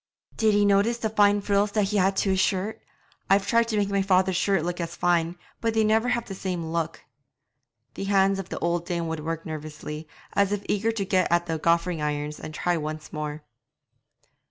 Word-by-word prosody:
'Did 220 -2 +3
ye 205 0 +4
notice 205 +4 +3
the 220 -2 -2
fine 205 -1 +4
frills 200 0 +1
that 210 -3 +1
he 210 - 0
has 190 0 +3
to 195 - +1
his 190 - +1
shirt? 200 +4 0 0.5
I've 195 +1 +4
tried 230 +2 +3
to 220 -2 -1
make 200 -1 +1
my 200 0 +2
father's 190 -1 +2
shirts 190 -1 +2
look 175 0 -3
as 170 0 -4
fine, 175 0 +1 0.2
but 225 -1 -1
they 220 - +4
never 220 +3 +2
have 235 -1 0
the 195 - -7
same 185 -3 -3
look.' 165 -1 -3 0.9
The 195 - -5
hands 195 0 +3
of 190 - -6
the - - -4
old 170 0 -1
dame 170 -1 -2
would 160 -1 -3
work 165 +1 -4
nervously, 155 0 -6 0.3
as 200 -1 +2
if 205 -1 -2
eager 215 +3 +1
to 215 -3 -2
get 185 -3 +1
at 175 0 +3
the 165 -2 -2
goffering 170 0 +1
irons 150 0 -2
and - - -7
try 175 +3 0
once 155 0 -6
more. 150 0 -4
190 Hz, 210 wpm, -26 LUFS, 165-205 Hz, 0.9 s, ye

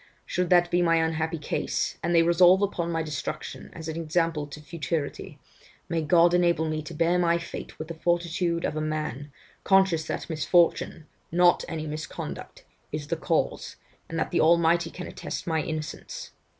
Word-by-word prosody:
Should 180 -1 -1
that 175 -1 +4
be 175 - +3
my 165 -1 +4
unhappy 160 0 0
case, 150 - -2
and 170 +1 0
they 165 - +6
resolved 180 +3 +5
upon 170 -4 -1
my 165 -1 -1
destruction 150 -4 -5
as 160 -1 -8
an 160 0 -4
example 165 -2 0
to 145 +1 -9
futurity, 150 -1 -4 0.5
may 165 -1 0
God 170 +2 +4
enable 170 -2 +3
me 155 0 -2
to 155 +2 -9
bear 170 +2 +2
my 170 -1 +3
fate 170 - -8
with 155 - -6
the 165 - -5
fortitude 170 0 0
of - - -2
a 155 - -1
man, 155 -2 -3 0.3
conscious 190 -4 +4
that - - -4
misfortune, 165 0 +2 0.3
not 175 +1 +4
any 160 -2 -4
misconduct, 155 0 -6 0.3
is 150 -1 -5
the - - +1
cause, - - -1 0.3
and 165 - -4
that 160 - -1
the - - +2
Almighty 170 +1 +4
can 180 +1 -7
attest - - -6
my 160 -2 0
innocence. 155 -1 -6
165 Hz, 175 wpm, -26 LUFS, 155-175 Hz, 0.5 s, they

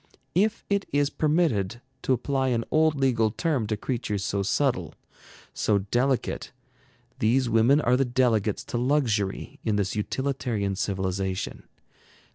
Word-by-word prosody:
If 210 +5 +1
it 200 -1 0
is 145 0 +2
permitted 145 - +1 0.2
to 130 - +1
apply 135 +2 0
an 120 -2 +1
old 155 0 +3
legal 120 -5 +2
term 135 -1 -1
to 110 0 -1
creatures 105 -4 -2
so 100 - -1
subtle, 100 - 0 0.6
so 105 - +1
delicate, 120 +7 -1 0.7
these 125 +4 +2
women 115 +5 +4
are 125 -4 +3
the 135 - +3
delegates 120 -5 +1
to 120 - +1
luxury 120 -7 0
in 110 - +1
this 100 -1 -1
utilitarian 115 -3 -1
civilization. 95 -1 -2
120 Hz, 130 wpm, -26 LUFS, 105-135 Hz, 0.7 s, women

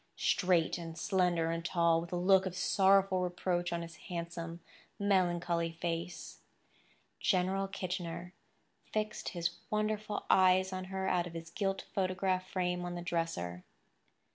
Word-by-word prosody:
Straight 180 -2 +2
and 165 -1 -7
slender 175 -3 +1
and 165 0 -2
tall, 170 -1 +3
with 170 - -8
a - - -1
look 190 +2 +4
of 180 -1 -5
sorrowful 195 0 +4
reproach 180 0 -1
on 170 0 -2
his 165 -1 -10
handsome, 170 -1 -5 0.4
melancholy 175 -4 +1
face, 170 +1 -4 0.8
General 190 +1 +1
Kitchener 180 -2 -4 0.6
fixed 215 0 -2
his 170 -1 -2
wonderful 215 0 -1
eyes 185 0 +5
on 185 0 -4
her 190 0 -3
out 175 -2 +1
of 170 - -10
his 165 0 -7
gilt 195 -2 -1
photograph 185 -1 0
frame 180 -1 -1
on 175 0 -4
the 175 - -5
dresser. 165 - -2
180 Hz, 140 wpm, -33 LUFS, 170-190 Hz, 0.8 s, eyes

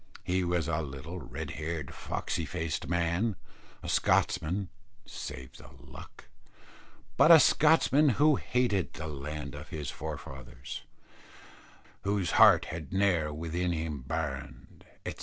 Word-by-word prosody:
He 95 0 0
was 85 -1 0
a 80 -1 0
little 75 +5 -7
red 70 - -6
haired 80 -3 -4
foxy - - -3
faced 80 -2 -3
man, 85 +5 +1 0.5
a - - -6
Scotchman 90 +5 +1 0.4
(save 65 -3 -8
the - - -13
luck), - - -13 0.9
but - - +6
a 165 -1 +11
Scotchman 150 -1 +5
who 150 -1 +5
hated 120 -7 0
the 80 - -6
land 75 -1 -5
of - - -9
his 75 -3 -4
forefathers, 75 -2 -7 1.2
"Whose 100 -3 0
heart - - +7
had 80 -3 -6
ne'er 95 -6 +2
within 85 +3 -2
him 80 -3 -3
burned," 70 -1 -5 0.2
etc. - - -5
85 Hz, 125 wpm, -30 LUFS, 75-95 Hz, 1.2 s, a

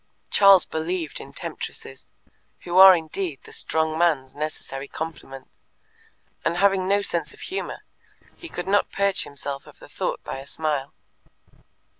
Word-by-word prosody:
Charles 195 -3 +7
believed 160 0 -3
in - - -10
temptresses, 65 - -7 0.5
who 175 +1 +1
are 190 -1 +11
indeed 165 -1 -4
the - - -14
strong 160 0 -1
man's 150 -7 +1
necessary 145 -2 -5
complement, 140 -5 -8 0.8
and 170 +1 0
having 195 -1 +3
no 200 +1 +2
sense 165 -5 -1
of - - -18
humour, 380 - -5 0.5
he 340 - -10
could 180 - -6
not 200 +1 +2
purge 200 -1 +1
himself 140 -1 -6
of - - -15
the - - -14
thought - - -3
by - - -5
a 135 - -11
smile. 150 -2 -2
165 Hz, 145 wpm, -24 LUFS, 145-190 Hz, 0.8 s, are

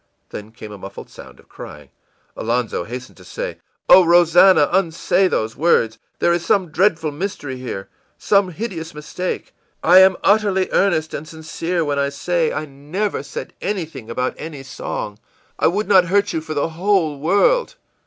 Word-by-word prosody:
î - - -47 0.3
Then 105 +1 -9
came 110 -1 -11
a 105 - -10
muffled 95 +1 -10
sound - - -13
of - - -21
crying. 75 -2 -11 0.5
Alonzo 115 -6 -2
hastened 125 +4 -8
to 95 - -15
say: - - -6 0.3
ìOh, 185 - +8
Rosannah, 175 -1 +5
unsay 185 +1 +2
those 110 -9 -2
words! 125 -8 +2 0.2
There 170 - +2
is 170 0 -1
some 185 0 +1
dreadful 165 -3 +1
mystery 145 -5 -5
here, 120 -6 -6 0.3
some 200 -2 +2
hideous 170 -4 -6
mistake. 180 +4 -5 0.3
I 180 +3 +7
am 190 0 +6
utterly 200 -2 +2
earnest 165 -5 +1
and 155 - -6
sincere 165 +2 -3
when 145 -1 -1
I 140 0 +1
say 165 +3 -1
I 155 - -3
never 150 +9 -4
said 485 - -8
anything 160 - -4
about 125 +2 -2
any 150 -4 -7
song. 105 -5 -6 0.4
I - - +4
would 205 +5 -1
not 190 -3 +5
hurt 200 +3 +1
you 160 - -1
for 155 -1 -6
the 145 +3 0
whole 165 -3 0
world.... 340 - +2
165 Hz, 170 wpm, -20 LUFS, 140-190 Hz, 0.5 s, ìOh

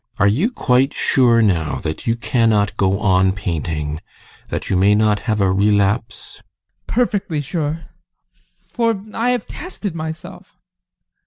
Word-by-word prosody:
GUSTAV. - - -6
Are 100 - +5
you 140 - +2
quite 135 - +1
sure 120 -5 +3
now 80 -9 +1
that 80 +6 -5
you 115 - +2
cannot 115 -3 +1
go 95 0 +1
on 95 -2 +3
painting 80 -6 -3 0.5
that - - -4
you 95 - 0
may 100 +3 +4
not 105 -1 +2
have 110 -1 +1
a 95 -1 +2
relapse? 100 +3 0
ADOLPH. - - -22 0.5
Perfectly 205 -9 0
sure! 155 +2 -3 0.9
For 230 -3 0
I 230 +2 0
have 250 -3 0
tested 220 - -6
myself. 160 0 -8
110 Hz, 145 wpm, -19 LUFS, 95-160 Hz, 0.9 s, Are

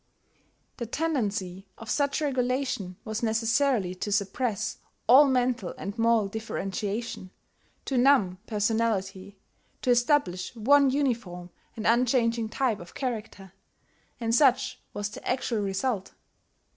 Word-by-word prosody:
The 235 - -4
tendency 210 - -2
of 225 - -11
such 285 +3 0
regulation 255 -8 -1
was 220 0 -3
necessarily 225 -2 +1
to 185 +3 -5
suppress 215 +2 -1 0.3
all 265 +5 +8
mental 250 -7 0
and 200 +1 -5
moral 230 -2 +3
differentiation, 205 -1 -4 0.6
to 265 -3 0
numb 240 -9 +4
personality, 205 -3 -1 0.5
to 250 - +3
establish 240 - +1
one 275 +5 +4
uniform 230 -11 -2 0.3
and 220 - -5
unchanging 235 -1 +2
type 240 -4 0
of 175 - -12
character; 210 -7 -5 0.7
and 230 -1 -1
such 260 0 +3
was 205 0 -3
the - - -10
actual 245 -3 0
result. 195 +1 -2
225 Hz, 115 wpm, -27 LUFS, 200-255 Hz, 0.7 s, all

